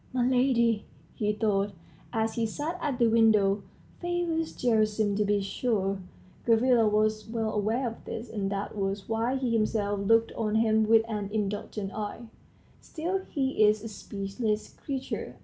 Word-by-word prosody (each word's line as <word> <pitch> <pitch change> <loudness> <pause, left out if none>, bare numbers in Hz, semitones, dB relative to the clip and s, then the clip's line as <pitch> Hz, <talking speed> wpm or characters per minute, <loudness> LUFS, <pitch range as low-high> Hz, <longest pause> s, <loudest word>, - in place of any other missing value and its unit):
"My 250 -1 +2
lady," 245 -4 +2 0.3
he 210 -1 0
thought, 205 -2 0 0.4
as 225 -1 0
he 230 -1 0
sat 295 +9 -3
at 280 -4 -1
the 240 - +4
window, 215 -3 +4 0.4
"favors 345 -2 -1
Gerasim, 215 -3 +2
to 210 - +3
be 205 0 +1
sure" 195 -1 -1 0.4
(Gavrila 230 0 +4
was 215 +1 +1
well 225 -1 -1
aware 220 +5 0
of 230 - -7
this, 230 +2 -5
and 200 -3 -3
that 200 +1 -3
was 195 -1 -2
why 225 +3 0
he 260 -3 -1
himself 210 -2 +1
looked 225 +3 +3
on 215 -1 -1
him 220 -1 +3
with 225 0 +5
an 210 -3 -3
indulgent 205 -1 -3
eye) 210 +2 -4 0.6
"still 350 +4 -3
he 265 -6 +1
is 210 0 +4
a - - -4
speechless 210 +1 -3
creature. 270 -2 -5
220 Hz, 155 wpm, -28 LUFS, 205-240 Hz, 0.6 s, with